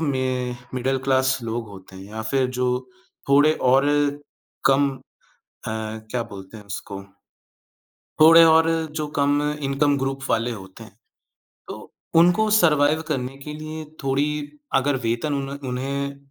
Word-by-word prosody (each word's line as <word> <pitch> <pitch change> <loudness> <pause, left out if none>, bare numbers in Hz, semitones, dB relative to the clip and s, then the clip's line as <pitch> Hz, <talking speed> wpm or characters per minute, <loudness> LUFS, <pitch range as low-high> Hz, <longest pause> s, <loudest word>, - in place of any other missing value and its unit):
मे 130 -4 -1 0.2
middle 130 +1 0
class 130 -1 +2
लोग 115 -1 -4
होते 95 -1 -13
हैं 95 - -10
या 110 +2 -7
फिर 130 +4 +1
जो 125 0 +1 0.6
थोड़े 145 +3 +5 0.2
और 135 +2 +4 0.8
कम 140 +1 +4 0.6
अ, - - -11
क्या 110 +2 -4
बोलते 100 +1 -11
हैं 105 - -12
उसको, 100 0 -7 1.2
थोड़े 165 +1 +9
और 160 0 +5 0.3
जो 150 - -2
कम 145 +1 +2 0.2
इनकम 140 +1 +1
ग्रुप 135 0 -3
वाले 115 +2 +1
होते 95 -4 -10
हैं, - - -16 0.7
तो - - -9 0.3
उनको 180 +6 +4
सर्वाइव 155 -3 +3
करने 135 -3 -3
के 150 - -6
लिए 155 +1 -7 0.2
थोड़ी 135 +2 +1 0.5
अगर 135 +1 +2
वेतन 120 +6 -1
उन्ह 140 -1 -5
उन्हें 140 +2 -3
135 Hz, 135 wpm, -23 LUFS, 115-145 Hz, 1.2 s, थोड़े